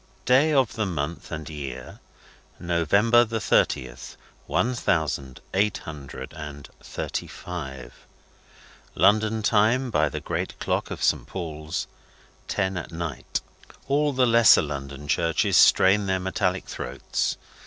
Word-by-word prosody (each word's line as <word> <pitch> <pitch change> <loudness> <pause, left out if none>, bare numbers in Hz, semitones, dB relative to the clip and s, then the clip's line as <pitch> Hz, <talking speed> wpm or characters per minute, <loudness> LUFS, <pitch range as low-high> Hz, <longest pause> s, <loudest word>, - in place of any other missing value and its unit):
Day 135 +5 +4
of 135 -6 +2
the 110 -2 -1
month 80 -1 -4
and 80 -2 -5
year, 70 -5 -7 0.6
November 100 +8 +3
the 115 -1 -3
thirtieth, 65 - 0 0.3
one 90 - +1
thousand 75 - -1
eight 100 +2 +2
hundred 75 -4 -9
and 75 -2 -8
thirty - - -4
five. 65 -8 -7 1.0
London 110 +1 +3
Time 115 +5 +3
by 75 -7 +2
the - - -4
great - - -4
clock - - -1
of - - -5
Saint - - +1
Paul's, 80 -3 -4 0.6
ten 95 -2 -1
at 85 - -6
night. 80 -4 -4 0.5
All 145 +1 +2
the 130 -1 +3
lesser 115 -6 +6
London 70 -1 -6
churches 85 +2 +1
strain 100 +2 +5
their 95 0 +1
metallic 95 0 -1
throats. 60 - -3
90 Hz, 125 wpm, -25 LUFS, 75-110 Hz, 1.0 s, lesser